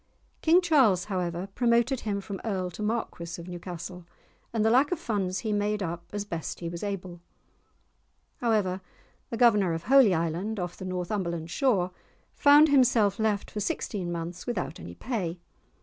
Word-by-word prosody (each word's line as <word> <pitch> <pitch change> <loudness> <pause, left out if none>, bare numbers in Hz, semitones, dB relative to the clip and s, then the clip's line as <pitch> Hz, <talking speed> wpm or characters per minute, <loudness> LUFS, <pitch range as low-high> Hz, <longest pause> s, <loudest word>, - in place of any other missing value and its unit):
King 335 +3 +5
Charles, 265 - +4
however, 180 -2 -2
promoted 240 +2 +2
him 200 -2 -2
from 195 -1 -7
Earl 185 -5 -2
to 175 - -8
Marquis 210 -6 -3
of 170 - -9
Newcastle, 180 0 -7 0.5
and 220 -2 0
the 220 - +4
lack 265 +6 +4
of 360 - +1
funds 200 - -2
he 215 - 0
made 205 0 0
up 170 0 -5
as 205 0 -3
best 165 -5 -5
he 170 - -4
was 170 0 -6
able. 185 -4 -5 1.2
However, 210 -7 0 0.5
the 230 - -4
Governor 210 -7 +4
of 165 - -5
Holy 250 -4 +6
Island, 170 +7 -2
off 180 -1 -4
the 185 - -8
Northumberland 175 -3 -3
shore, 195 -9 +1 0.4
found 295 +1 +6
himself 240 -7 +4
left 215 -2 0
for 210 - -4
sixteen 190 -2 -2
months 170 +1 -5
without 235 -7 -3
any 85 - -9
pay! 185 - -3
200 Hz, 165 wpm, -28 LUFS, 175-225 Hz, 1.2 s, Holy